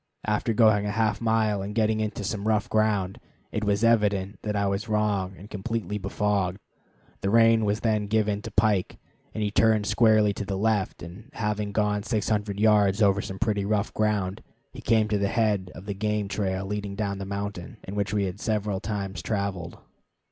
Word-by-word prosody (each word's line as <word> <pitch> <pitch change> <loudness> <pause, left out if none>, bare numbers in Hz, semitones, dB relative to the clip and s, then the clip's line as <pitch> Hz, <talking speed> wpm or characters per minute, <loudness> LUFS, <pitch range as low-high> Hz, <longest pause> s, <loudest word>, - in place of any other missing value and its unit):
After 105 +2 0
going 110 -2 +4
a 105 +1 -3
half 110 -1 +1
mile 110 -3 +1
and 100 +2 -5
getting 110 -1 +2
into 105 -1 -3
some 105 +1 -3
rough 110 +1 +2
ground, 105 -4 0 0.3
it 110 - -2
was 100 +1 +1
evident 105 -3 +2
that 105 -1 -3
I 100 0 +1
was 100 +3 -2
wrong 105 -3 0
and 100 - -11
completely 105 0 -3
befogged. 100 -1 0 0.6
The 100 - -1
rein 115 0 +5
was 105 +1 0
then 110 -2 +1
given 105 -1 +1
to 115 - -7
Pike, 105 -3 +1 0.4
and 110 - -1
he 105 - -1
turned 110 -1 +3
squarely 110 -2 +4
to 105 - -4
the 95 -1 -3
left, 105 -1 0
and, 95 +9 -10
having 105 -3 -2
gone 105 0 +1
600 105 -2 -1
yards 105 -1 +4
over 100 0 +3
some 95 - -6
pretty 105 -2 0
rough 100 0 0
ground, 105 -3 0 0.3
he - - -9
came 110 -1 +3
to 105 -1 0
the 100 - +1
head 105 -5 0
of 95 - -10
the 100 - -3
game 105 0 -1
trail 95 -1 -2
leading 100 0 -4
down 100 -1 -2
the - - -4
mountain, 100 +3 -5
and 95 - -7
which 100 -1 -1
we 105 -1 +1
had 95 +1 -4
several 105 -3 -1
times 100 -3 -4
traveled. 100 -3 -3
105 Hz, 190 wpm, -26 LUFS, 100-110 Hz, 0.6 s, rein